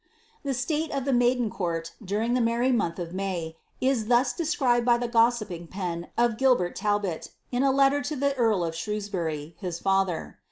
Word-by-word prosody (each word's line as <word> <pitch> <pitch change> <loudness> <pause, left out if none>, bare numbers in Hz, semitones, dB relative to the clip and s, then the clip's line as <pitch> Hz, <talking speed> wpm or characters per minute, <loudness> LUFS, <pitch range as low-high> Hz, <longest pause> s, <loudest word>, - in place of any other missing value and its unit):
The 275 -2 -2
state 300 +5 -1
of 275 -2 -2
the 275 - +1
maiden 245 -2 +2
court, 165 -3 -3
during 210 +5 -1
the 250 - +2
merry 235 +3 +2
month 175 -9 0
of 175 -1 -5
May, 180 -4 -3 0.2
is 255 -5 +1
thus 245 +1 +3
described 260 -6 +1
by 240 0 +4
the 240 0 -2
gossiping 230 -7 +1
pen 175 -2 -4
of 235 -2 +2
Gilbert 250 -10 +3
Talbot, 205 -5 -1 0.2
in 245 0 0
a 275 - +4
letter 275 +1 +3
to 285 +2 -3
the 280 +1 +1
eui 225 -9 +1
of 165 - -4
Shrewsbury, 170 -5 -3
his 180 -4 -4
father. 195 -2 0
230 Hz, 185 wpm, -26 LUFS, 180-250 Hz, 0.2 s, by